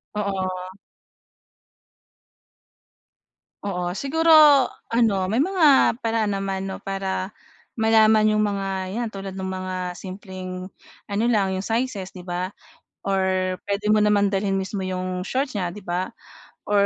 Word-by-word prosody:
Oo. 185 -2 -3 2.9
Oo 180 -3 -2
siguro, 320 +7 +1 0.6
ano 230 -4 +3
may 225 - +1
mga 315 -6 +4
paraan 225 -3 0
naman, 195 0 -3
'no, 190 - -7
para 195 0 -3 0.5
malaman 220 -1 +5
'yong 215 0 +3
mga 200 -2 -1 0.2
'yan 235 +3 -2
tulad 195 -2 -7
ng 190 - -3
mga 185 -1 -4
simpleng 185 -1 -7 0.4
ano 205 +2 -1
lang 195 -4 +1
'yong 190 - -3
sizes, 225 -4 -2
'di 180 -1 -11
ba, 180 +1 -3 0.5
or 195 -1 +1 0.5
puwede 205 +1 0
mo 215 - +5
naman 205 -1 +3
dalhin 195 0 0
mismo 195 +1 -3
'yong 185 0 -3
shorts 260 -4 -1
niya, 175 -2 -3
'di 210 - -10
ba, 180 +1 -2 0.6
or 205 -1 +4
195 Hz, 130 wpm, -23 LUFS, 185-215 Hz, 2.9 s, malaman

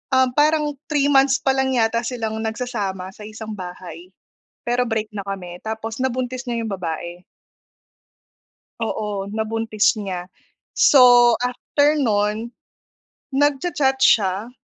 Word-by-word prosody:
um, 260 0 +4
parang 300 +1 +2 0.2
3 290 -2 +2
months 270 0 +5
pa 270 - +1
lang 265 0 +1
yata 230 0 +2
silang 225 -3 -4
nagsasama 205 -5 -4
sa 210 - -16
isang 220 0 -7
bahay 180 -2 -9 0.6
pero 245 +1 +1
break 220 -2 -2
na 200 - -3
kami 180 -3 -6
tapos 220 +1 -5
nabuntis 255 0 -2
niya 235 -1 -2
yung 220 - -4
babae. 175 -1 -5 1.6
Oo, 210 -3 -3
nabuntis 220 0 0
niya. 185 -3 -5 0.4
So 245 -3 +6
after 290 +4 +1
no'n, 210 -2 0 0.8
nagcha-chat 275 -1 +1
siya, 200 +1 +3
225 Hz, 120 wpm, -21 LUFS, 200-260 Hz, 1.6 s, So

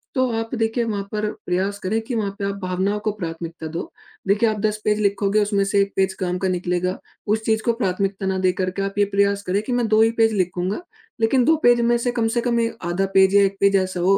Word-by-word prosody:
तो 260 -1 +2
आप 225 +1 -5
देखिए 225 +1 0
वहाँ 210 -3 -2
पर 215 0 -1 0.2
प्रयास 190 +3 -1
करें 220 +4 0
कि 230 +2 -5
वहाँ 210 -3 -1
पे 200 - -2
आप 200 - -2
भावनाओं 190 +3 -1
को 215 - +2
प्राथमिकता 165 -4 -6
दो। 165 +2 -6 0.4
देखिए 215 +3 +3
आप 215 -1 -2
10 215 -1 0
पेज 210 0 +2
लिखोगे 200 +1 +2
उसमें 205 -1 +1
से 200 0 +2
1 200 0 -1
पेज 190 0 +2
काम 180 -1 -1
का 190 - 0
निकलेगा। 180 +1 -1 0.3
उस 215 +1 +1
चीज़ 220 0 +1
को 235 - +3
प्राथमिकता 195 -2 -2
ना 190 0 0
देकर 185 0 +1
के 195 - -4
आप 195 0 -3
ये 205 - +5
प्रयास 200 0 +2
करें 195 +3 +1
कि 250 - -5
मैं 240 -2 +1
2 215 0 +4
ही 225 +1 +4
पेज 225 -1 +4
लिखूँगा। 185 - -1 0.4
लेकिन 245 +2 +3
2 320 - +5
पेज 240 0 +5
में 235 0 +3
से 245 +1 -1
कम 235 -2 0
से - - +3
कम 240 0 0
में 230 -1 +2 0.2
आधा 185 +3 0
पेज 190 +1 +5
या 200 - +7
1 195 0 0
पेज 200 0 +4
ऐसा 185 -1 -2
हो 195 +3 +4
200 Hz, 255 wpm, -22 LUFS, 190-225 Hz, 0.4 s, या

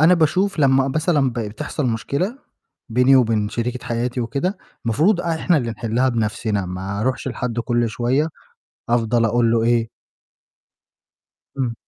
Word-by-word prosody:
أنا 165 +4 +6
باشوف 180 +4 +1
لمّا 135 -1 +4
مثلًا 150 -2 +1
ب - - -9
بتحصل 115 +6 -3
مشكلة 140 - -2 0.5
بيني 125 +3 +5
وبين 110 -4 +2
شريكة 125 +3 -3
حياتي 120 +1 -2
وكده، 140 - -2 0.3
المفروض 160 - +2
إحنا 170 0 +1
اللي 120 -5 -1
نحِلّها 115 +4 0
بنَفْسنا، 105 -4 -1
ما 95 +3 -4
أرُوحش 130 +3 -1
لحَد 120 -1 -3
كُلّ 120 -1 0
شوية 125 +8 0 0.6
أفضل 115 0 +2
أقول 115 +1 +2
له 115 -1 +2
إيه 115 -1 +2 1.7
إمم. 120 -3 -1
120 Hz, 135 wpm, -21 LUFS, 115-140 Hz, 1.7 s, أنا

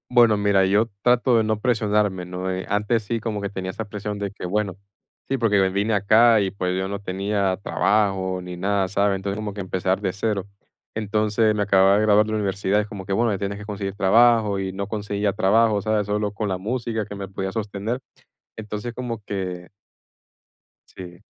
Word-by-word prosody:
Bueno, 120 -3 +6
mira, 100 -2 +3
yo 105 +4 +3 0.2
trato 125 0 +4
de 110 - +2
no 110 -1 -1
presionarme, 105 -6 +1
¿no? 90 +1 -4
Eh, 95 0 -3
antes 105 +2 0
sí 115 +2 -3
como 110 -2 -3
que 100 - -3
tenía 95 -2 -4
esa 110 - -5
presión 105 0 -5
de 100 -1 -2
que, 100 - -8
bueno, 100 0 -1 0.5
sí, 135 - +1
porque 105 -5 +3
vine 100 +4 0
acá 110 +2 +5
y, 95 -1 -1
pues, 90 -2 -2
yo 95 0 -2
no 100 0 -4
tenía 100 0 -1
trabajo 95 -3 +1
ni 90 0 -7
nada, 95 +1 0
¿sabes? 100 +1 +1
Entonces, 100 +1 -3
como 105 -1 -4
que 100 - -5
empezar 95 +1 -1
de 95 -3 0
cero. 100 0 -2 0.5
Entonces, 110 0 +1
me 105 - 0
acababa 95 -1 +5
de - - +2
graduar 105 0 +4
de 110 - -3
universidad, 100 -1 0
es 105 - -6
como 100 -2 -8
que, 100 - -2
bueno, 110 0 +1
tienes 100 0 -3
que 105 - -9
conseguir 100 -2 -5
trabajo, 110 0 +4
y 95 -1 -3
no 100 +1 -4
conseguía 105 -1 -1
trabajo, 105 +2 +3
¿sabes? 105 0 0
Solo 105 0 -1
con 105 0 -3
la 95 - -1
música 110 +2 -3
que 105 - -8
me 100 -1 -6
podía 95 -1 -4
sostener. 110 +3 -3 0.6
Entonces, 110 +2 -5
como 120 -3 -5
que 90 -3 -5 1.2
Sí. 90 -2 -11
100 Hz, 195 wpm, -23 LUFS, 95-110 Hz, 1.2 s, Bueno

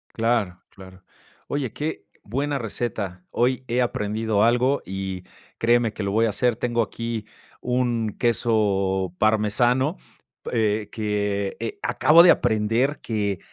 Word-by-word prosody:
Claro, 115 -6 0
claro. 95 -1 -14 0.4
Oye, 140 -5 -3
qué 155 +2 -4 0.2
buena 140 +6 -2
receta. 105 -6 -4
Hoy 130 +2 0
he 125 +2 +1
aprendido 110 -2 0
algo 125 +4 +3
y 95 -1 -5 0.3
créeme 120 -1 +2
que 110 - -6
lo 100 - -1
voy 115 +2 +3
a - - +1
hacer. 120 +2 +1
Tengo 120 0 0
aquí 115 0 -4 0.3
un 120 -3 -1
queso 100 -6 +1
parmesano, 120 - +2 0.6
eh, 110 -2 0
que, 105 -2 -2
eh, 115 - -4
acabo 130 +7 +6
de 180 - +8
aprender 115 +7 +1
que 100 -4 -2
115 Hz, 130 wpm, -24 LUFS, 105-120 Hz, 0.6 s, de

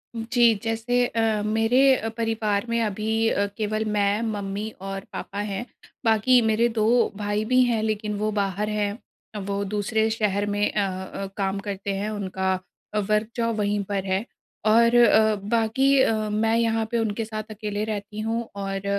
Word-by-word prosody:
जी, 230 0 +3
जैसे 235 +2 +1
अ, 225 -2 0
मेरे 225 +3 +2 0.2
अ, 225 -1 -3
परिवार 225 -2 0
में 235 - +1
अभी 220 +1 0
अ, 200 -2 +1
केवल 215 0 -1
मैं, 205 0 +1
मम्मी 205 -1 -3
और 195 0 -5
पापा 200 +1 -5
हैं 195 +4 -3 0.4
बाकी 230 +3 +4
मेरे 225 +1 +2
2 215 - +3 0.3
भाई 205 +1 -1
भी 255 +2 +4
हैं 235 -3 +1
लेक़िन 215 -1 -1
वो 215 +1 -1
बाहर 200 0 -1
हैं। 210 0 -1 0.5
वो 200 0 -2
दूसरे 210 +2 0
शहर 205 -2 0
में 205 0 +1
अ 205 -2 +1 0.3
अ, 195 - -4
काम 195 0 -1
करते 200 -1 -4
हैं 205 +2 -2
उनका 190 -2 -1 0.6
वर्क 215 +1 +1
जॉब 230 -2 0
वहीं 205 -1 0
पर 195 -1 -1
है। 190 +3 -1 0.4
और 230 +2 +5
अ, 220 -2 +5
बाकी 230 +6 +2
अ, 225 - +3 0.2
मैं 220 +2 +1
यहाँ 225 -1 +1
पे 235 - +1
उनके 225 0 -1
साथ 215 0 -5
अकेले 210 -1 -3
रहती 210 0 -5
हूँ 225 +1 -2
और 195 0 -4
215 Hz, 165 wpm, -24 LUFS, 205-225 Hz, 0.6 s, और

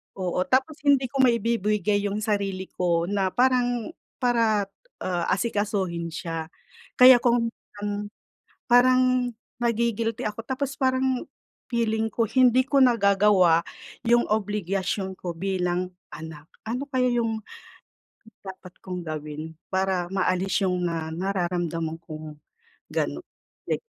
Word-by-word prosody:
oo. 180 -2 -2
Tapos 270 +4 +1
hindi 270 -2 +4
ko 275 - -3
maibibigay 210 -4 +1
yung 205 +1 -3
sarili 195 -3 -2
ko 170 -2 +1
na 200 -2 +1
parang 245 -1 +2 0.3
para, 230 -4 +2 0.4
ah, 175 -2 -1
asikasuhin 200 -7 -1
siya. 165 -1 -4 0.5
Kaya 250 0 +9
kung 235 -1 +2 0.2
parang 205 0 -3 0.8
parang 255 +1 +6 0.6
nagi-guilty 235 0 0
ako 210 +2 -6
tapos 270 +2 -3
parang 260 -1 +1 0.5
feeling 225 -1 +1
ko 230 - +1
hindi 255 +1 +4
ko 280 - +3
nagagawa 200 -7 +4 0.4
yung 240 +1 +4
obligasyon 195 -2 -1
ko 175 -2 -4
bilang 180 0 -1 0.3
anak. 155 -1 -9 0.2
Ano 250 +4 -2
kaya 255 -2 +1
yung 230 -2 0 1.0
dapat 185 -1 -10
kong 180 -2 -5
gawin 155 +1 -6 0.2
para 190 -2 0
maalis 190 +1 0
yung 180 -1 0
na 165 -2 -3
nararamdaman 175 -3 -2
kong 155 -2 -9 0.5
ganun, - - -2 0.4
like - - 0
205 Hz, 115 wpm, -25 LUFS, 180-235 Hz, 1.0 s, Kaya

